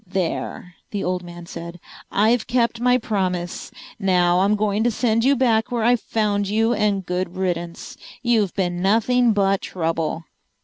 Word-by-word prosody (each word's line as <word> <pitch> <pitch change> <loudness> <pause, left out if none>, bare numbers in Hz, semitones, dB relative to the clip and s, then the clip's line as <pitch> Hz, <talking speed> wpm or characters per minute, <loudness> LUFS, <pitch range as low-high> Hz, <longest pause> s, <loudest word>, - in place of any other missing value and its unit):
"There!" 180 -1 -3 0.2
the 205 -2 -3
old 180 0 -1
man 175 -1 -10
said. 170 +1 -8 0.3
"I've 220 +3 +2
kept 235 -1 +1
my 250 0 +4
promise. 185 -6 -2 0.3
Now 180 -3 +3
I'm 200 +3 +3
going 210 0 0
to 240 - +3
send 230 0 +1
you 275 +2 +4
back 230 -4 +2
where 235 -2 0
I 240 +2 +5
found 210 -3 -1
you, 225 +3 +2
and 205 -4 0
good 180 0 -3
riddance. 175 -2 -3 0.3
You've 225 -6 +2
been 175 -2 -1
nothing 230 +5 +3
but 195 -2 +2
trouble." 165 -2 -2
200 Hz, 160 wpm, -22 LUFS, 180-225 Hz, 0.3 s, I